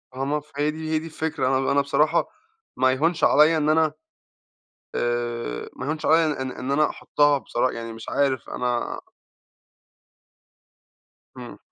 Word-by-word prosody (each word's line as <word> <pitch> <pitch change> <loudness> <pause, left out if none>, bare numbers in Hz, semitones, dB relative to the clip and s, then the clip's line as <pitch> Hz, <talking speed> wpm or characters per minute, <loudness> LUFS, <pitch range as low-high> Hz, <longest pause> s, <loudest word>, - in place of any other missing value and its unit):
آه، 135 +1 -2
ما 150 +2 0
ف 150 0 -21
هي 150 +1 +1
دي 155 0 -6
هي 155 - +2
دي 160 - -9
الفكرة 160 -4 -2
آه، 130 0 +2
أنا 135 - 0
أنا 140 0 +4
بصراحة 150 +4 +1 0.5
ما 130 0 +4
يهونش 160 +6 0
عليّا 155 +2 +5
إن 155 0 +1
أنا 155 -1 +3 1.0
آآ، 120 - -2
ما 130 - -6
يهونش 155 +2 -3
عليّا 155 -3 +3
إن 130 0 -3
إن 130 +2 -5
أن 140 - +1
أحطها 145 -1 +2
بصرا 130 -1 -1
يعني 115 -1 -6
مش 115 0 -9
عارف 135 -3 0
أنا 125 -1 -2 2.4
إمم. - - -9
140 Hz, 160 wpm, -24 LUFS, 130-155 Hz, 2.4 s, عليّا